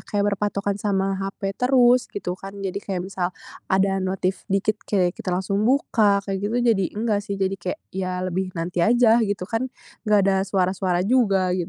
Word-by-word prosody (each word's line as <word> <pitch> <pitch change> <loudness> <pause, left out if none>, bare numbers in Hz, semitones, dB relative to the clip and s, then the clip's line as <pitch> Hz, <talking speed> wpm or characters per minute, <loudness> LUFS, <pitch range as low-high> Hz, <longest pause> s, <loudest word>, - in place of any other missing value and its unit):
kayak 205 0 -1
berpatokan 200 0 -2
sama 195 -1 0
HP 195 0 -3
terus 250 -1 +4
gitu, 180 -3 -4
kan. 195 +1 -8
Jadi 195 0 -4
kayak, 185 -3 -4
misal 185 -2 -2 0.4
ada 195 0 +2
notif 190 0 -2
dikit, 195 +2 +1 0.2
kayak 180 -4 +2
kita 190 - -8
langsung 190 +3 0
buka, 210 -7 +2
kayak 195 -1 -3
gitu, 210 +4 -1 0.2
jadi 195 -3 0
enggak 215 -2 0
sih, 200 -1 -5
jadi 195 0 0
kek, 180 - -3 0.2
ya 185 -1 -3
lebih 185 +1 -2
nanti 170 +1 -2
aja 235 +3 +5
gitu, 200 -4 -1
kan, 225 +6 -2 0.4
enggak 210 -1 +5
ada 195 -1 +3
suara-suara 185 -1 0
juga 200 -6 +2
gitu. 180 -2 -2
195 Hz, 180 wpm, -23 LUFS, 185-205 Hz, 0.4 s, aja